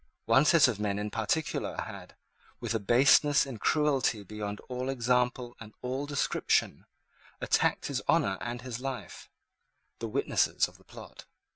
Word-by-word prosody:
One 125 +6 +4
set 160 -3 +6
of 115 -5 -2
men 100 -1 -1
in 105 0 -3
particular 115 +8 -2
had, - - -8 0.4
with 115 -2 -3
a 115 - 0
baseness 135 +7 +4
and 125 -6 -8
cruelty 140 -8 +1
beyond 105 +1 -6
all 125 +1 -5
example 125 -1 0
and 110 -2 -12
all 130 +3 -3
description, 140 -1 0 0.5
attacked - - +1
his - - -2
honour 95 -1 +2
and 120 +1 -5
his 125 -2 -5
life, 135 -1 -7 0.7
the 115 - -4
witnesses 125 +6 +1
of - - -18
the - - -21
plot. - - -12
125 Hz, 150 wpm, -29 LUFS, 110-135 Hz, 0.7 s, set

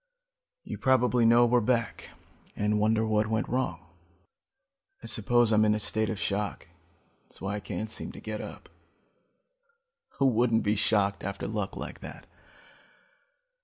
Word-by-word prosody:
You - - -7
probably 125 -2 +3
know 120 +1 +6
we're 120 +1 +3
back 115 0 -1 0.5
and 105 0 0
wonder 110 +1 +2
what 110 0 +1
went 110 +2 -1
wrong. 95 -9 -2 1.2
"I - - -8
suppose 120 +1 +3
I'm 110 0 +4
in 105 0 +3
a - - -2
state 110 +1 0
of 110 - -3
shock. 100 -3 -3 0.6
That's - - -17
why 95 +1 -3
I 105 - -3
can't 105 +1 -5
seem 110 - -3
to - - -10
get 110 -1 -5
up. - - -9 1.5
Who 135 - +2
wouldn't 120 -2 +3
be 105 +1 +1
shocked 100 -1 +1
after 100 +1 -4
luck 105 -2 -3
like - - -7
that? - - -10
110 Hz, 150 wpm, -28 LUFS, 105-120 Hz, 1.5 s, know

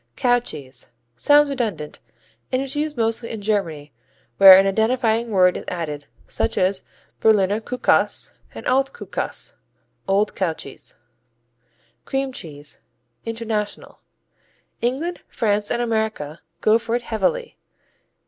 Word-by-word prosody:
Cow 245 -1 +3
cheese 140 - -8 0.3
Sounds 290 - +5
redundant, 210 - -3 0.5
and 255 - +1
is 270 +1 -1
used 300 -1 -2
mostly 230 0 0
in 225 - -5
Germany, 170 -9 -2 0.4
where 190 -1 +11
an 195 - +5
identifying 225 +3 +1
word 185 -3 +4
is - - -5
added, 150 -5 -4 0.2
such - - -2
as 185 +1 +1 0.4
Berliner 210 -1 +3
Kuhkäse 250 +2 +1 0.2
and - - -8
Alt 270 +1 +2
Kuhkäse: - - -5 0.5
old 200 +2 +2
cow 180 -4 0
cheese. 140 -3 -10 1.1
Cream 270 -1 -2
cheese 145 - -8 0.5
International 225 -2 -4 0.8
England, 285 +9 -1
France 210 -2 0
and 240 0 0
America 220 -10 -2 0.2
go 220 +1 +4
for 230 0 -2
it 240 - -2
heavily. 475 - -1
220 Hz, 120 wpm, -22 LUFS, 185-245 Hz, 1.1 s, where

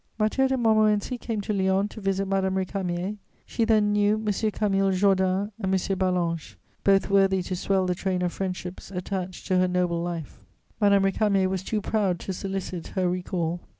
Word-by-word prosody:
Mathieu 220 +5 +2
de 265 0 0
Montmorency 215 0 +2
came 225 -3 -3
to 210 - -2
Lyons 195 +1 +1
to 220 - -9
visit 195 0 0
Madame 190 -1 0
Récamier. 190 +1 -2 0.3
She 230 - 0
then 215 -2 +3
knew 205 0 +3
M. 215 -1 -1 0.2
Camille 195 -2 +1
Jordan 190 +1 +2
and 190 -3 -1
M. 190 - +3 0.2
Ballanche, 175 -4 -1 0.3
both 195 0 +3
worthy 195 -1 +3
to 185 - -3
swell 190 +1 +1
the 180 - +1
train 185 0 -1
of 175 - -1
friendships 185 -1 -5
attached 185 -1 -5
to 185 -1 +2
her 185 - +3
noble 180 -2 0
life. 170 -3 -5 0.4
Madame 200 -2 +4
Récamier 195 -1 +2
was 190 -1 -2
too 210 +2 -2
proud 195 -4 0
to 190 - -4
solicit 190 -2 -4
her 185 -2 -1
recall. 175 -1 -2
195 Hz, 180 wpm, -26 LUFS, 185-205 Hz, 0.4 s, Madame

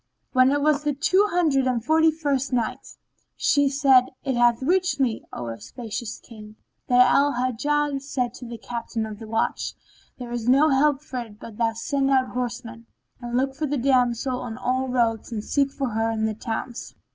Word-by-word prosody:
When 255 0 +5
it 285 0 +1
was 300 -1 +3
the 295 -2 0
Two 365 +8 +3
Hundred 305 -8 +2
and 240 -3 -1
Forty 320 +2 +4
First 285 -4 -1
Night, 240 -3 -3 0.4
She 285 -1 +3
said, 270 -2 +4 0.2
It 265 - -1
hath 240 0 +3
reached 360 -1 +1
me, 245 -5 0
O 120 - -5
auspicious 205 - -6
King, 215 -2 -13 0.3
that 250 0 +5
Al 285 +1 +3
Hajjaj 275 +3 0
said 255 -4 -2
to 250 - -9
the 235 0 -7
Captain 230 -1 -4
of 215 -1 -8
the 225 - -9
Watch, 225 +1 -1 0.4
"There 245 -2 -8
is 240 0 -2
no 280 +5 +5
help 285 +1 +2
for 260 -4 -5
it 220 -3 -9
but 220 -2 -10
thou 230 -1 +1
send 270 +4 -1
out 260 -2 +2
horsemen, 240 -2 -5 0.3
and 240 0 -2
look 265 +1 0
for 300 +3 -3
the 290 +1 -1
damsel 250 -1 +1
on 230 -2 -6
all 255 +1 -1
the 250 - -4
roads 230 -2 0
and 215 -2 -4
seek 280 +3 +1
for 275 -2 -3
her 225 0 0
in 220 -1 -1
the 220 - -1
towns." 225 +2 -5
255 Hz, 195 wpm, -24 LUFS, 230-280 Hz, 0.4 s, When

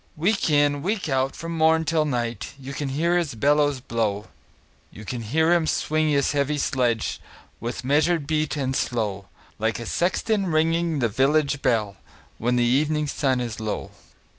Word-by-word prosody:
Week 195 +4 +1
in, 145 -1 +3
week 195 +3 -1
out, 135 0 0
from 165 0 -5
morn 160 0 +3
till 155 0 +1
night, 120 -6 -3
You 135 +1 -7
can 140 0 -3
hear 165 +6 +1
his 155 -8 -3
bellows 145 +3 +2
blow; 110 -4 -2 0.6
You 110 - -12
can 120 +2 -4
hear 160 +10 +2
him 170 -2 +2
swing 155 0 +1
his 140 -2 +2
heavy 145 0 0
sledge, 125 -5 0 0.4
With 120 +2 -5
measured 150 +4 +2
beat 155 0 -1
and 135 -2 -1
slow, 105 -7 -2 0.3
Like 110 +1 0
a 115 - -6
sexton 195 - 0
ringing 165 0 +1
the 120 -4 +2
village 140 +5 +1
bell, 105 -4 0 0.4
When 120 +2 +1
the 120 - +3
evening 150 +5 +2
sun 135 -3 0
is 120 -3 -4
low. 110 -1 -4
140 Hz, 165 wpm, -24 LUFS, 120-155 Hz, 0.6 s, in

